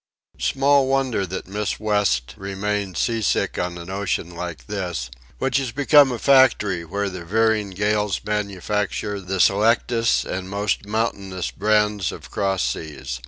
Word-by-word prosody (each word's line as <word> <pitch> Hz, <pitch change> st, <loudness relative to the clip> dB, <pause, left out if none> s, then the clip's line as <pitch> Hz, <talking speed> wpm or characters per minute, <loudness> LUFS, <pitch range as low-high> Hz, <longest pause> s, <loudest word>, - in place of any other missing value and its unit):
Small 140 Hz, 0 st, +3 dB
wonder 130 Hz, -7 st, 0 dB
that 95 Hz, +1 st, -5 dB
Miss 105 Hz, +2 st, -3 dB
West 105 Hz, -, +1 dB
remains 100 Hz, -1 st, -3 dB
sea 115 Hz, -1 st, 0 dB
sick 105 Hz, -, 0 dB
on 90 Hz, -1 st, -2 dB
an 85 Hz, +2 st, -8 dB
ocean 95 Hz, -3 st, -2 dB
like 85 Hz, -7 st, -6 dB
this, 85 Hz, -9 st, -4 dB, 0.3 s
which 130 Hz, -1 st, +1 dB
has 135 Hz, -4 st, -1 dB
become 145 Hz, +1 st, +5 dB
a 120 Hz, -, -2 dB
factory 115 Hz, -9 st, +4 dB
where 100 Hz, +5 st, -2 dB
the 90 Hz, -3 st, -6 dB
veering 110 Hz, +2 st, +1 dB
gales 105 Hz, +1 st, 0 dB
manufacture 105 Hz, 0 st, -2 dB
the 95 Hz, +1 st, -3 dB
selectest 115 Hz, +4 st, +3 dB
and 95 Hz, 0 st, -4 dB
most 100 Hz, 0 st, -1 dB
mountainous 100 Hz, -4 st, -2 dB
brands 105 Hz, -3 st, +1 dB
of -, -, -11 dB
cross 95 Hz, -2 st, 0 dB
seas. 70 Hz, -5 st, -4 dB
100 Hz, 145 wpm, -22 LUFS, 95-110 Hz, 0.3 s, become